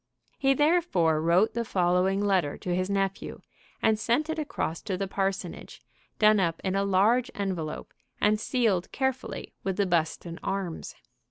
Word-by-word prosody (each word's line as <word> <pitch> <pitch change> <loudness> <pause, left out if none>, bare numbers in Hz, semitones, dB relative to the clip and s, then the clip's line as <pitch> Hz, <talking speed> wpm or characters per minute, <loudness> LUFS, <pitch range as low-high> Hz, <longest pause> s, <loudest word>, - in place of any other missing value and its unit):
He 270 0 +3
therefore 295 - +2
wrote 175 +6 +3
the 235 - -1
following 190 0 +1
letter 185 -8 +1
to 180 - -3
his 185 +2 -1
nephew, 195 -1 -2 0.4
and 220 -1 +3
sent 285 +8 +1
it 320 - -3
across 220 - -3
to 190 - -3
the 195 +1 -2
parsonage, 195 +2 -3 0.4
done 215 -1 +5
up 165 -3 0
in 190 - -1
a 195 0 +1
large 205 +6 +3
envelope, 180 -6 -4 0.3
and 210 0 +3
sealed 215 -7 0
carefully 265 -1 -3
with 190 -1 -2
the 200 - +2
Buston 170 0 -1
arms. 195 -4 -4
195 Hz, 155 wpm, -27 LUFS, 180-220 Hz, 0.4 s, done